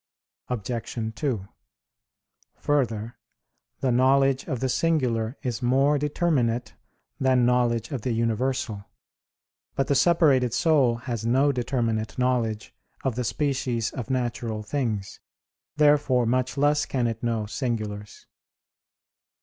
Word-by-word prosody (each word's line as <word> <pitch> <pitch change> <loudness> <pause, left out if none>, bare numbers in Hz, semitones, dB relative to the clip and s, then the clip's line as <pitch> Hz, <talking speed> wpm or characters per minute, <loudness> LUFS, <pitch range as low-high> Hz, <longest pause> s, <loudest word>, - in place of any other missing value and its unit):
Obj. 115 -1 -4
2: 115 -9 -2 1.1
Further, 120 -6 -1 0.6
the 130 - +1
knowledge 135 +2 +3
of 130 - -3
the 130 - 0
singular 125 -6 0
is 125 -1 -3
more 135 +4 +3
determinate 140 -6 0 0.5
than 130 -2 +3
knowledge 120 -2 +1
of 135 -5 -3
the 125 - -2
universal. 115 -1 -1 0.9
But 135 - +1
the - - +1
separated 135 -5 +3
soul 135 -4 +3
has 120 -4 -3
no 130 +5 +3
determinate 115 -4 -2
knowledge 120 -4 -1 0.3
of 135 - 0
the 125 +2 -2
species 130 -4 -1
of 125 -1 -6
natural 120 -4 -2
things, 110 -5 -3 0.6
therefore 145 -4 +4
much 130 +3 0
less 145 +1 +2
can 125 -3 -1
it 115 -1 -2
know 115 -3 -1
singulars. 105 -4 -4
125 Hz, 115 wpm, -25 LUFS, 115-135 Hz, 1.1 s, therefore